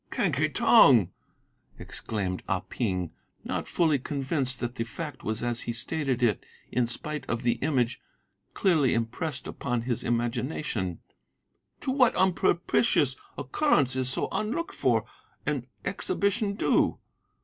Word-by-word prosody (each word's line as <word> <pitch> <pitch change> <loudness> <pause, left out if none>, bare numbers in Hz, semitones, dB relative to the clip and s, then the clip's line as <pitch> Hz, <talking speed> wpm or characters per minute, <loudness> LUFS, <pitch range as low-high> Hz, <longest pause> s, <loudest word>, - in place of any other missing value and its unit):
"'Quen - - +1
Ki - - +1
Tong!' - - +6 0.7
exclaimed 95 -4 -3
Ah 95 -1 +1
Ping, 90 -7 -2 0.3
not - - -3
fully 160 -5 +2
convinced 135 -1 -2
that 120 0 -3
the 115 - -2
fact 145 +6 -7
was 110 +1 -2
as 120 -1 0
he 120 - -3
stated 130 +1 -1
it 110 -5 +2 0.3
in 125 -1 +1
spite 150 +5 -4
of 120 +1 -2
the 120 -1 +1
image 125 -5 0 0.5
clearly 155 -10 +3
impressed 125 +6 -2
upon 125 -3 -2
his 120 -2 -2
imagination; 120 - -2 0.8
'to 260 - -1
what 260 -3 +4
unpropitious 175 - +2 0.2
occurrence 140 - +2
is 130 -1 0
so 130 - -1
unlooked 290 +11 -2
for 115 -5 +1 0.4
an 135 -4 -1 0.2
exhibition 200 +1 0
due? - - +2
130 Hz, 130 wpm, -28 LUFS, 115-155 Hz, 0.8 s, Tong